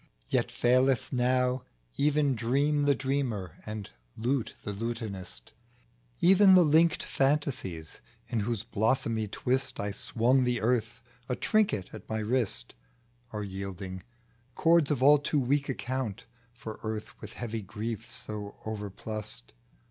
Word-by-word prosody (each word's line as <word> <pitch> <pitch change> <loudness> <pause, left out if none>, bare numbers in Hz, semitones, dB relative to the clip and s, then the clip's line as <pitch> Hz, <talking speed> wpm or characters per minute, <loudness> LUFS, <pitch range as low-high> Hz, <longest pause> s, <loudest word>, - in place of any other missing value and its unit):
Yea, - - +4
faileth 130 +1 +2
now 125 0 +2 0.3
even 145 -1 +2
dream 140 +5 +1
The 140 -1 +4
dreamer, 130 - -2
and 110 -2 -5 0.2
the - - -10
lute 130 -3 0
the 105 - -3
lutanist; 100 - -5 0.7
Even 190 +1 +7
the 180 -2 +7
linked 160 +2 +4
fantasies, 135 - -1 0.3
in 115 -1 -1
whose 110 0 -1
blossomy 115 0 0
twist 130 +5 0
I_swimg 115 +5 +1
the 125 -1 +1
earth 120 0 0 0.3
A 125 - +1
trinket 200 - +1
at - - -10
my. 110 0 -1
JKtist 120 -1 -1
T - - -18 0.6
Are 105 -1 -3
yielding; 95 -1 -6 0.5
cords 165 -3 +4
of 140 -4 0
all 145 +1 +8
too 145 +1 0
weak 140 +2 +1
account 130 -5 -3 0.3
For 110 -2 -8
earth 110 -1 -4
with 110 0 -8
heavy 115 -2 -4
griefs 110 +3 -5
so 105 -3 -6
overplussed. 105 - -6
120 Hz, 135 wpm, -29 LUFS, 105-135 Hz, 0.7 s, all